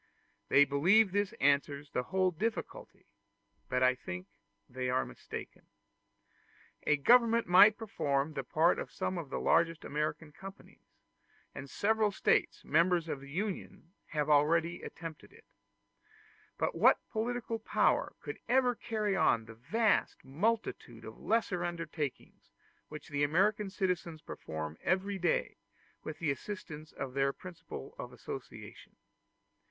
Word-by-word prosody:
They 145 - +7
believe 180 +10 +4
this 205 +1 0
answers 145 -5 +1
the - - 0
whole 185 +7 +1
difficulty, 220 +7 -4 0.6
but 125 0 +1
I 130 0 +5
think 90 -7 -7 0.4
they 125 0 -3
are 130 +1 +1
mistaken. - - -9 1.2
A 150 - +4
government 235 - +5
might 200 +4 +7
perform 150 -9 -1
the 135 -2 -3
part 160 +7 +2
of - - -6
some 185 - -2
of 155 -5 -7
the - - -3
largest 165 -1 +2
American 150 +1 -3
companies; 190 +5 -13 0.6
and 135 +1 -8
several 215 +4 +1
States, - - +1
members 170 +2 +3
of 145 - -3
the 140 - -11
Union, 185 0 -5
have 150 -1 -1
already 160 +4 +3
attempted 165 -2 -9
it; - - -19 1.1
but - - 0
what - - +4
political 230 0 -2
power 220 - +1
could - - -7
ever 250 0 +4
carry 215 -3 -2
on 115 -10 +3
the 115 - -11
vast 210 - 0
multitude 210 +12 -2
of - - -10
lesser 200 -6 0
undertakings 165 -4 -5 0.4
which 155 0 -9
the 145 0 0
American 195 +7 +2
citizens 180 -5 -2
perform 80 0 -6
every 190 +1 0
day, 175 -2 0 0.5
with 155 - -6
the 155 -4 0
assistance 155 0 -7
of 135 -2 -6
the 135 0 +2
principle 165 - -9
of - - -6
association? - - -9
165 Hz, 135 wpm, -32 LUFS, 145-205 Hz, 1.2 s, They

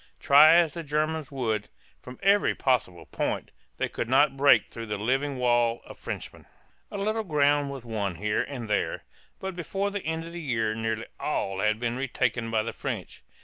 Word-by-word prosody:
Try 150 +3 +7
as 170 -3 +4
the 170 - -5
Germans 155 -1 -1
would, 110 -6 -2 0.3
from 125 0 -10
every 200 +1 +4
possible 120 -10 0
point, - - -3 0.3
they - - 0
could 115 - -4
not 135 +2 +4
break 135 -5 +5
through 115 0 -8
the 105 -1 -2
living 135 +6 0
wall 120 -1 +2
of - - -12
Frenchmen. - - -7 0.4
A - - -6
little 215 +3 -1
ground 145 -4 +2
was 135 -3 -7
won 105 -5 -2
here 105 +4 0
and 125 -5 -5
there, 105 -1 -1 0.4
but 190 -1 -5
before 195 +4 -2
the 205 0 -3
end 160 +1 -2
of 170 - -9
the 175 - -6
year 115 -7 0
nearly 110 +1 -2
all 95 -10 -2
had 110 +1 +1
been 120 0 -2
retaken 125 -3 -1
by 110 -1 +1
the 115 - -4
French. - - -5
130 Hz, 190 wpm, -27 LUFS, 115-155 Hz, 0.4 s, Try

